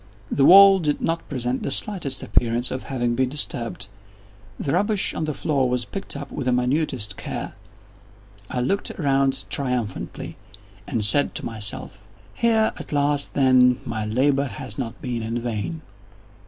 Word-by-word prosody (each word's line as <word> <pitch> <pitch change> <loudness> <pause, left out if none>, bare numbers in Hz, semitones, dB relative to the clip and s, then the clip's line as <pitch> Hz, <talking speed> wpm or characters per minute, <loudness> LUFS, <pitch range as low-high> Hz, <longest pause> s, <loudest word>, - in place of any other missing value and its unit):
The 135 - +3
wall 195 +2 +9
did 150 -4 0
not 165 0 -2
present 125 -1 -2
the - - -2
slightest 145 -3 -1
appearance 120 +1 +1
of 130 - -3
having 120 -3 -2
been 130 +1 +1
disturbed. 120 -8 -3 0.7
The 140 - -2
rubbish 205 +5 +1
on 160 - -2
the 155 - -2
floor 135 -3 0
was 125 -1 -1
picked 195 -7 -6
up 140 -1 -8
with 135 - -4
the - - +3
minutest 125 -5 0
care. - - -5 1.0
I 125 - -2
looked 195 +11 -1
around 135 -3 0
triumphantly, 125 -7 -3 0.5
and 110 -3 0
said 140 +7 +4
to - - -3
myself: 105 -3 -3 0.3
"Here 225 -2 +2
at - - -8
least, 145 0 0
then, 130 -2 +4
my 110 -1 -3
labor 135 +5 +2
has 115 -2 -7
not 115 -4 -5
been 120 -2 -3
in 115 +2 -3
vain." 120 +7 -4
130 Hz, 155 wpm, -23 LUFS, 120-145 Hz, 1.0 s, wall